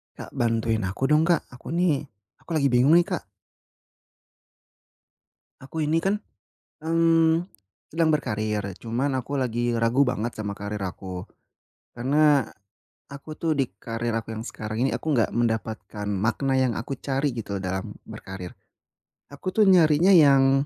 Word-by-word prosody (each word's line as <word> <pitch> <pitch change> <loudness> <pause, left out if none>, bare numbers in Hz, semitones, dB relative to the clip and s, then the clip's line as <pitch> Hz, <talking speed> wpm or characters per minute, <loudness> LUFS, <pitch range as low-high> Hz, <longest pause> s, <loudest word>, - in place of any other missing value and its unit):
Kak, - - -9
bantuin 115 -3 0
aku 105 +9 -2
dong 155 +1 +4
Kak, 170 -1 +3
aku 125 +5 -8
nih, 170 -5 +1 0.3
aku - - -22
lagi 140 -3 +2
bingung 125 +5 +4
nih 175 - +7
Kak. 180 -4 -3 2.4
Aku 135 +4 -9
ini 155 +2 +2
kan, 195 +3 +1 0.7
mmm, 165 0 +3 0.5
sedang 160 0 +2
berkarir 110 -6 -1 0.2
cuman 120 +5 -1
aku 140 +3 -4
lagi 120 -1 0
ragu 115 +4 +3
banget 120 -1 -1
sama 105 -2 -4
karir 105 +1 -5
aku, 90 0 -6 0.7
karena, 140 +1 +3 0.6
aku 140 +3 -9
tuh 165 - 0
di 135 - +3 0.2
karir 115 0 -3
aku 115 - -8
yang 110 - -5
sekarang 110 -2 -6
ini 135 - +2
aku - - -4
enggak 115 - +2
mendapatkan 110 -3 -2
makna 120 +7 0
yang 130 -2 +2
aku 120 - -5
cari 140 0 -1
gitu 110 -4 -5
dalam 95 0 -4
berkarir. 95 -2 -8 0.8
Aku 165 +6 -5
tuh 215 +1 +4
nyarinya 165 -1 +5
yang, 135 -5 +6
130 Hz, 140 wpm, -25 LUFS, 110-155 Hz, 2.4 s, nih